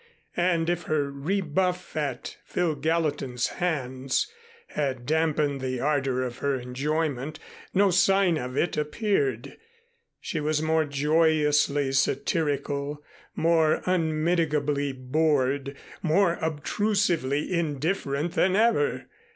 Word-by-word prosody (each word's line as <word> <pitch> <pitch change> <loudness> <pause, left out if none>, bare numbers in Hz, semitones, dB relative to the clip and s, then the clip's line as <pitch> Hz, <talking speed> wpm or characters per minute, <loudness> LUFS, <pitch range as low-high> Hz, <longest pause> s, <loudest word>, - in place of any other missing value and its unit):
And 175 -2 +1
if 175 -1 -1
her 145 -2 0
rebuff 180 +4 -1
at 140 -5 -3
Phil 175 -3 0
Gallatin's 145 -5 -1
hands 135 - 0 0.4
had 130 -4 -2
dampened 150 -2 +1
the 130 -1 -2
ardor 135 -2 0
of 125 -1 -5
her 140 -1 0
enjoyment, 140 +3 -2 0.3
no 195 0 +3
sign 195 -1 +4
of 125 +2 -5
it 170 - 0
appeared. 150 - -1 0.6
She 165 - -3
was 150 0 0
more 160 0 +2
joyously 150 -1 +2
satirical, 145 0 -1 0.3
more 160 -1 +2
unmitigably 155 -4 +1
bored, 140 0 0 0.3
more 175 +1 +2
obtrusively 160 -2 0
indifferent 155 -1 -1
than 185 +2 +2
ever. 235 - +2
150 Hz, 100 wpm, -26 LUFS, 140-170 Hz, 0.6 s, sign